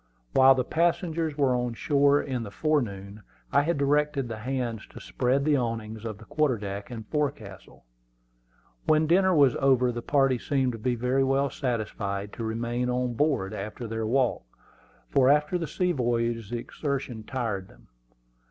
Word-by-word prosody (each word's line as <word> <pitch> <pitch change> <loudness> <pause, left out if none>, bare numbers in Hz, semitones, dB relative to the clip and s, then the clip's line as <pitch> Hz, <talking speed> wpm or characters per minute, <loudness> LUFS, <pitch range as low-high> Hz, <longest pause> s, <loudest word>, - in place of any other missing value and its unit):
While 135 0 +7
the 130 - +1
passengers 165 0 0
were 135 -3 +3
on 125 -1 -1
shore 145 +2 +3
in 130 -3 -3
the 110 - -6
forenoon, 100 -4 -2 0.3
I - - +4
had 165 +2 0
directed 140 -1 +1
the 110 -2 -6
hands 120 -2 -3
to - - -12
spread 125 - 0
the 150 -1 +3
awnings 115 -2 -3
on 110 -2 -6
the 110 - -14
quarter 150 -3 +1
deck 100 -1 -6
and 115 -3 -7
forecastle. 135 - -4 1.0
When 155 0 +4
dinner 185 +3 +4
was 140 -5 +5
over 130 -2 +3
the 120 0 -5
party 135 -1 +2
seemed 135 -2 0
to 115 - -7
be 125 +3 0
very 125 +3 +1
well 135 +1 +1
satisfied 105 -5 -3
to 115 - -6
remain 120 +2 -2
on 125 0 -1
board 120 -7 0
after 105 +4 -6
their 110 0 -3
walk, 125 +1 +1 0.7
for 130 - +3
after 150 +5 +3
the 165 - -3
sea 180 +4 0
voyage 115 - -1
the 120 - -2
exertion 135 -2 -4
tired 110 -6 -3
them. - - -20
125 Hz, 170 wpm, -27 LUFS, 115-140 Hz, 1.0 s, While